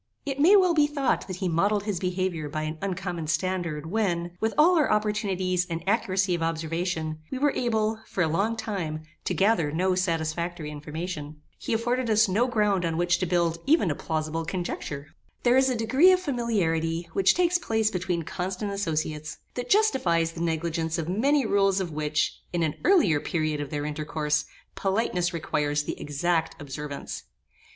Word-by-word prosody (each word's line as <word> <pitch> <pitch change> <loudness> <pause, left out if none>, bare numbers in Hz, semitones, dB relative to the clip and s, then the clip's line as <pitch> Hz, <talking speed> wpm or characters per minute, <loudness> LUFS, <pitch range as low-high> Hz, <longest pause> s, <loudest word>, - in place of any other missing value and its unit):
It 275 -1 -3
may 350 +8 +7
well 370 -3 +5
be 300 -2 +4
thought 280 -8 0
that 185 - -4
he 185 0 -2
modelled 200 +5 +1
his 205 -4 -2
behaviour 180 -4 -2
by 155 +1 -3
an 155 +1 -4
uncommon 180 -4 -3
standard, 160 -1 -1
when, 175 -5 0
with 220 0 +1
all 335 +4 +6
our 300 - +2
opportunities 195 -4 0
and 165 -1 -4
accuracy 190 -3 +1
of 170 - -1
observation, 165 0 -2
we 265 - -4
were 290 +2 +3
able, 220 -2 0
for 185 - 0
a - - +2
long 200 +8 0
time, 165 -9 -3 0.2
to - - -1
gather 190 -7 +2
no 185 +4 +1
satisfactory 170 -2 -2
information. 150 0 -6 0.2
He - - -5
afforded 240 +2 0
us 220 0 +4
no 215 +7 +2
ground 210 -6 +1
on 165 -1 -1
which 175 0 +2
to 185 - -1
build 170 -1 +1
even 290 - +4
a - - -2
plausible 160 +1 -2
conjecture. 160 -5 -4 0.4
There 245 0 +4
is 265 0 +4
a 255 - 0
degree 260 +11 +5
of 370 - +4
familiarity 175 - -1
which 195 -1 +4
takes 355 0 +2
place 220 -8 +1
between 180 -2 -1
constant 185 +5 -3
associates, 155 -5 -2 0.2
that 245 - -5
justifies 190 - +3
the 165 - -7
negligence 165 -1 -1
of 165 0 -3
many 270 +8 +2
rules 195 -2 +3
of 180 -3 -3
which, 150 0 -1
in 175 -1 0
an 155 -2 0
earlier 325 - +4
period 155 -2 -1
of 145 - -5
their 145 0 -3
intercourse, 150 0 -1 0.3
politeness 190 -3 0
requires 150 -3 -1
the - - -5
exact 160 +3 -1
observance. 145 0 -6
180 Hz, 175 wpm, -26 LUFS, 160-220 Hz, 0.4 s, may